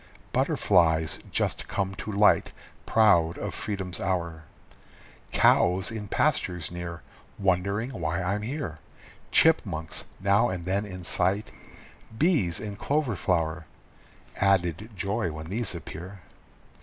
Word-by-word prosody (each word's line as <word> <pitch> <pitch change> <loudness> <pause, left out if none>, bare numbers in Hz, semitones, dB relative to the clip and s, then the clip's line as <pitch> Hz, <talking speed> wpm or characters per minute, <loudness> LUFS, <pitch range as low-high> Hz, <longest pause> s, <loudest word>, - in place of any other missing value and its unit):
Butterflies 80 -4 +2
just - - -1
come 95 -1 -1
to 105 +3 -6
light, 105 +1 +4 0.4
proud 85 -7 +4
of - - -4
freedom's 95 -4 -4
hour, 85 -4 -2 0.9
Cows 95 +4 +4
in 110 -2 -5
pastures 90 -3 0
near, 85 -1 -6 0.3
Wondering 100 +5 0
why 85 -6 -2
I'm 100 +3 -1
here, 110 - -4 0.5
Chipmunks 90 - +2
now 100 +5 +3
and 90 -2 -4
then 100 +3 0
in 90 -2 -8
sight, 95 +4 +1 0.7
bees 145 - +2
in 105 -2 -6
clover 140 -2 0
flower 80 -1 -1 0.7
Added 95 +1 +1
joy 100 -1 -1
when 80 +1 -7
these 105 -1 -1
appear! 90 +4 -8
95 Hz, 115 wpm, -27 LUFS, 85-105 Hz, 0.9 s, light